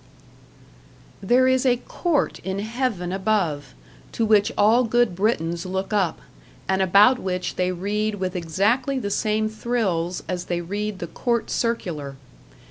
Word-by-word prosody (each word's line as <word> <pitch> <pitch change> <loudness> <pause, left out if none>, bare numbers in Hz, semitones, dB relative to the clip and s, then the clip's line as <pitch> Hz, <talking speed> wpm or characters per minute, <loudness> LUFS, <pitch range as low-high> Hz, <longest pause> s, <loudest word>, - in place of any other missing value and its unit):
There 245 +6 +4
is 260 -1 +3
a 250 -2 +3
court 320 +4 -1
in 190 0 -4
Heaven 220 -4 -2
above, 190 - -1 0.4
to 230 - 0
which 215 +1 +3
all 225 +4 +5
good 240 -4 +2
Britons 170 -4 0
look 190 +2 -3
up, 190 -6 0 0.5
and 190 0 +1
about 205 +7 +5
which 185 -1 -3
they 180 0 0
read 205 +4 -2
with 185 -2 -3
exactly 205 - 0
the 205 -6 -3
same 215 +1 0
thrills 215 -6 -2
as 180 -1 -3
they 175 -1 -2
read 205 +4 -4
the 175 - -5
Court 235 +6 -2
Circular. 170 - -2
205 Hz, 140 wpm, -23 LUFS, 180-230 Hz, 0.5 s, all